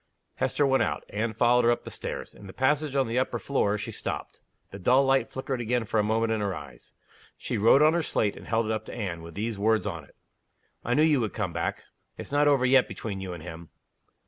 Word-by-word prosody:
Hester 145 - +1
went 135 -1 +3
out. - - -1
Anne 110 +1 -2
followed 120 +1 +4
her 120 - +4
up 120 - +1
the - - -8
stairs. - - -6
In 100 - -13
the 95 - -10
passage 145 +2 +1
on 135 -3 +2
the 115 +2 0
upper 130 - -1
floor 105 -7 0
she 105 - -5
stopped. - - -5 0.3
The 100 - -8
dull 130 +8 +4
light 135 0 +2
flickered 130 -1 -4
again 120 0 0
for 110 - 0
a - - +3
moment 110 +1 +1
in 110 -1 0
her 100 -2 -1
eyes. 75 -5 -11 0.4
She - - -4
wrote 115 +7 +6
on 155 +1 +5
her 170 - +1
slate, 105 -9 0
and - - -12
held 115 0 +1
it 110 - -2
up 110 0 -2
to - - -7
Anne, 90 -7 -4
with 85 0 -11
these 110 0 -3
words 110 +1 +2
on 85 -3 -4
it: - - -21 0.7
"I 120 - 0
knew 150 - +4
you 155 -3 +4
would 110 -3 -2
come 100 -6 -2
back. 85 - -3 0.3
It's - - -8
not 145 +1 +3
over 140 -3 +4
yet 130 0 +5
between 100 -4 -6
you 95 -2 -5
and 85 -3 -9
him." 85 -1 -9
115 Hz, 250 wpm, -27 LUFS, 100-130 Hz, 0.7 s, wrote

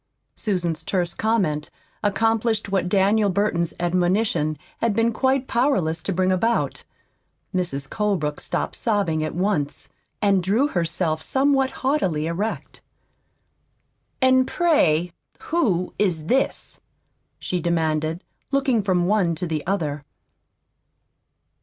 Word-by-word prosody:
Susan's 175 -6 -2
terse 175 -3 -1
comment 185 -10 0 0.3
accomplished 220 +1 +1
what 185 -2 0
Daniel 200 +2 +3
Burton's 185 -3 0
admonition 175 -2 +1 0.2
had 230 -3 +1
been 230 +1 +2
quite 265 +2 +1
powerless 190 - +1
to 195 - -3
bring 185 0 +1
about. 225 +6 0 0.7
Mrs. 155 -7 -2
Colebrook 180 -7 -1
stopped - - -3
sobbing 200 -9 0
at 155 - -4
once, 175 -6 -1 0.3
and 200 -3 +3
drew 220 +11 +2
herself 165 - -1
somewhat 270 - +2 0.2
haughtily 190 - +1
erect. 190 +7 -4 1.4
"And, 260 0 +5
pray, 180 - +2 0.3
who 210 - 0
is 175 -7 +1
this?" 260 +10 -1 0.6
she 180 - -2
demanded, 160 0 0 0.3
looking 270 -5 +2
from 185 -3 +1
one 185 -4 +2
to 170 - -3
the 155 -3 -2
other. 150 -7 -1
190 Hz, 110 wpm, -23 LUFS, 165-225 Hz, 1.4 s, And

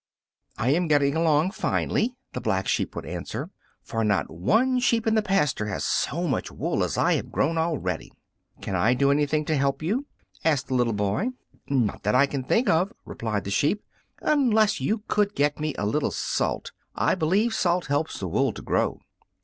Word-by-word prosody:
"I 120 - 0
am 170 +3 +2
getting 145 -1 +3
along 160 +1 +3
finely," 235 +3 0 0.2
the - - -4
Black 95 -3 0
Sheep - - 0
would - - -5
answer, - - -5 0.3
"for 115 0 -2
not 100 -2 +1
one 225 - +2
sheep 235 -2 +2
in 220 - +2
the 220 - +3
pasture 170 - +1
has 100 - -3
so 170 +4 0
much 135 - -2
wool - - -1
as - - -2
I - - +3
have - - -2
grown 165 +4 +1
already." 145 - -2 0.5
"Can 95 - -3
I 110 +7 +3
do 140 +2 +3
anything 150 +1 +1
to 155 - 0
help 140 +1 0
you?" 240 - -1 0.4
asked 150 -4 +1
the - - -1
little 120 -2 +2
boy. 105 - 0 0.4
"Not 125 -7 0
that 105 +1 +1
I 140 - +6
think 140 - 0
of," 180 +6 +2
replied 105 -3 -3
the 100 - -5
sheep, 150 - +1 0.4
"unless 230 -8 +3
you 210 0 -1
could 205 -1 +1
get 145 +1 +1
me 155 0 -2
a 100 - -1
little 140 +8 +1
salt. - - -2 0.2
I - - +2
believe 190 +7 +1
salt 180 -4 +1
helps 145 +3 -1
the 95 - -3
wool 85 - +1
to - - -9
grow." - - 0
150 Hz, 190 wpm, -25 LUFS, 120-195 Hz, 0.5 s, I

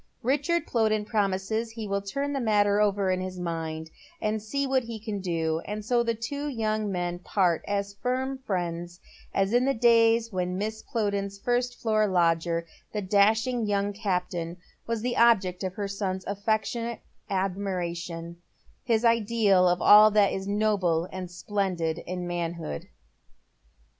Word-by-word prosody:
' - - -38
Richard 340 +4 0
Plowden 215 -2 +1
promises 210 +1 0
that 225 - -15
he 220 -2 -5
will 200 0 -1
turn 275 +9 -3
the 275 - -1
matter 205 -3 +3
over 200 -2 +2
in 185 0 0
his 185 0 -5
mind, 160 -2 -4 0.3
and 215 0 -1
see 280 +7 -2
what 265 -1 +2
he 230 -1 -6
can 210 -1 -4
do, 165 -3 -1
and 210 0 -5
so 240 +1 +2
tlie 230 -1 -2
two 285 +6 -3
young 215 -5 -1
men 175 -1 -2
part, 180 -2 +1
as 200 0 -2
firm 260 +5 -2
friends 175 -6 -3 0.3
as 195 +2 +1
in 245 +1 +4
the 275 - +1
days 230 0 +4
when 180 -1 -2
Mrs. 220 +1 -4
Plowden's 200 -3 -1
first 245 +3 -1
floor 215 -2 +2
lodger, 170 -2 +1 0.3
the 210 -1 -3
dashing 220 +4 +2
young 200 0 0
captain, 180 -4 -2 0.3
was 230 -1 -2
the 245 0 -1
object 200 -6 +4
of 185 -1 -3
her 205 -1 -2
son's 190 -2 -3
afEectionate 220 +3 -2 0.3
admiiation, 180 -3 -3 0.5
his 235 -2 +1
ideal 220 -5 +4
of 175 0 0
all 210 +1 +9
that 205 -1 +4
is 190 0 -4
noble 200 -5 +1
and 185 -1 -6
splendid 175 -3 -2
in 180 0 -4
manhood. 170 - -4
200 Hz, 160 wpm, -27 LUFS, 180-225 Hz, 0.5 s, all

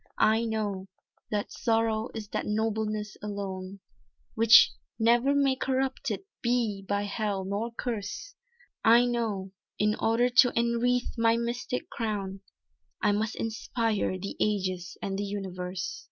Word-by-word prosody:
"I 220 +2 +3
know, 205 -4 -2 0.4
that 205 -1 -2
Sorrow 225 -1 0
is 215 -2 -5
that - - -3
nobleness 215 -1 -1
alone, 195 -2 -5 0.5
Which 230 0 +7 0.3
never 240 +5 +3
may 275 -2 +3
corrupted 265 0 -1 0.2
be 235 -5 0
by 205 0 +1
hell 205 -1 -2
nor 205 +4 -2
curse, 230 - -4 0.5
I 235 +2 +6
know, 220 -6 -2 0.3
in 210 0 +2
order 230 +3 +2
to 245 0 +6
enwreathe 235 +1 +1
my 230 0 +4
mystic 240 +2 -3
crown 200 -4 -3 0.6
I - - +3
must 215 +2 -1
inspire 225 -3 -1
the 195 +2 -6
ages 185 -4 -1
and 195 0 -2
the - - -1
universe." 185 -2 -4
220 Hz, 125 wpm, -28 LUFS, 200-235 Hz, 0.6 s, Which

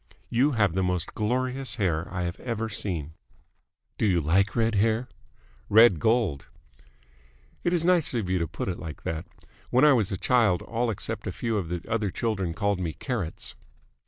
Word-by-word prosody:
You 135 +5 +3
have 100 -7 +2
the 95 - 0
most 90 -1 -1
glorious 130 +3 -1
hair 85 -8 -1
I 90 -1 -2
have 85 0 -4
ever 115 -2 -3
seen!" 85 -8 -3 0.9
"Do 110 - +2
you 90 -3 +3
like 95 +6 +2
red 115 -1 +2
hair?" 110 +4 +1 0.6
"Red 110 -5 +7
gold." 110 - +1 1.2
"It 175 - +1
is 170 -2 +1
nice 175 -3 +3
of 110 -6 -1
you 90 0 +1
to 85 - -1
put - - -5
it 90 - -3
like 80 -5 -8
that. 80 -1 -4 0.4
When 130 +4 +4
I 150 - +7
was 110 -7 +1
a 95 - -2
child 110 -6 +2
all 115 +1 -1
except 105 - -3
a - - -1
few 115 -1 -2
of 95 -6 -2
the 85 0 -3
other 110 -3 0
children 95 -5 -2
called 100 -2 0
me 85 -4 -2
Carrots." 110 - -4
105 Hz, 185 wpm, -27 LUFS, 90-120 Hz, 1.2 s, Red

